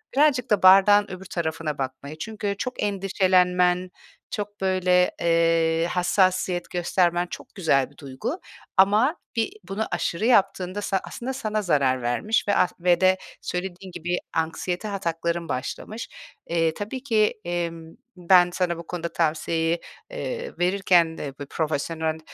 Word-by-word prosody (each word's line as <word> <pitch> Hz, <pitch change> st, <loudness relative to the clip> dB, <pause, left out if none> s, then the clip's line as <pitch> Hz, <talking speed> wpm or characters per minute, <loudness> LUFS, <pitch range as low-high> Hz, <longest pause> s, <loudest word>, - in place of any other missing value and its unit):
birazcık 280 Hz, -4 st, +3 dB
da 210 Hz, -3 st, +2 dB
bardağın 195 Hz, +2 st, +7 dB
öbür 185 Hz, +1 st, -8 dB
tarafına 160 Hz, -3 st, -3 dB
bakmayı. 135 Hz, +3 st, -5 dB
Çünkü 205 Hz, +2 st, -4 dB
çok 250 Hz, +4 st, -4 dB
endişelenmen, 185 Hz, -2 st, +2 dB, 0.4 s
çok 205 Hz, -1 st, -5 dB
böyle, 185 Hz, -1 st, +3 dB
eee, 165 Hz, 0 st, +2 dB
hassasiyet 185 Hz, 0 st, +1 dB
göstermen 175 Hz, 0 st, +1 dB
çok -, -, -10 dB
güzel 155 Hz, -8 st, +2 dB
bir 145 Hz, -, -24 dB
duygu 140 Hz, -, -5 dB, 0.4 s
ama 210 Hz, -, +4 dB, 0.2 s
bir 225 Hz, -2 st, 0 dB, 0.2 s
bunu 210 Hz, +3 st, -2 dB
aşırı 175 Hz, +2 st, -1 dB
yaptığında 195 Hz, -4 st, +2 dB
sa 195 Hz, -1 st, 0 dB
aslında 255 Hz, +3 st, -5 dB
sana 215 Hz, -5 st, -2 dB
zarar 140 Hz, -8 st, +1 dB
vermiş 120 Hz, -, 0 dB
ve 205 Hz, -, +2 dB
as 180 Hz, -1 st, +3 dB
ve 175 Hz, 0 st, +3 dB
de 185 Hz, 0 st, +5 dB, 0.2 s
söylediğin 185 Hz, +1 st, -5 dB
gibi 175 Hz, 0 st, -2 dB, 0.2 s
anksiyete 175 Hz, +5 st, -2 dB
atakların 170 Hz, -3 st, -2 dB
başlamış. 215 Hz, -, -4 dB, 0.4 s
Eee, 165 Hz, -1 st, +1 dB
tabii 220 Hz, +8 st, -6 dB
ki, 220 Hz, -6 st, +2 dB
emm, 170 Hz, -2 st, -4 dB, 0.2 s
ben 180 Hz, 0 st, +5 dB
sana 175 Hz, -2 st, 0 dB
bu 170 Hz, -, -9 dB
konuda 170 Hz, -1 st, -4 dB
tavsiyeyi, 165 Hz, +1 st, 0 dB, 0.3 s
eee, -, -, -4 dB
verirken 175 Hz, -3 st, +3 dB
de 140 Hz, -2 st, -5 dB
bu 145 Hz, -, -5 dB
profesyonel, 160 Hz, +1 st, -2 dB
180 Hz, 135 wpm, -24 LUFS, 165-200 Hz, 0.4 s, bardağın